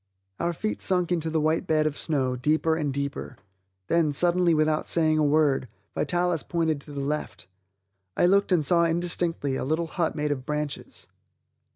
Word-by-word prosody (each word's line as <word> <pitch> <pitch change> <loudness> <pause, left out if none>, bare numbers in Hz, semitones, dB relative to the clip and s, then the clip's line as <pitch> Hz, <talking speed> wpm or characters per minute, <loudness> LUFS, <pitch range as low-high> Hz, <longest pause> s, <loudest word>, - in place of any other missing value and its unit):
Our 170 - 0
feet 215 +6 -4
sunk 180 -2 +2
into 165 -2 0
the 160 0 0
white 155 +2 0
bed 155 -1 +2
of 155 -2 -1
snow, 135 -6 -1
deeper 155 +5 +1
and 150 -3 -1
deeper. 140 -2 -4 0.5
Then, 165 - +1
suddenly, 175 +3 +3
without 155 0 +1
saying 155 -2 +2
a - - +3
word, 145 -3 +2 0.3
Vitalis 175 -2 0
pointed 160 -4 -1
to 150 - -10
the 140 -1 -4
left. 140 - -4 0.7
I - - +4
looked 200 +2 +3
and 165 -5 +3
saw 170 +4 +3
indistinctly 165 -4 -1
a - - -3
little 155 +5 0
hut 165 0 -2
made 150 -1 -1
of 130 -3 -3
branches. 150 +1 -5
155 Hz, 175 wpm, -26 LUFS, 145-170 Hz, 0.7 s, I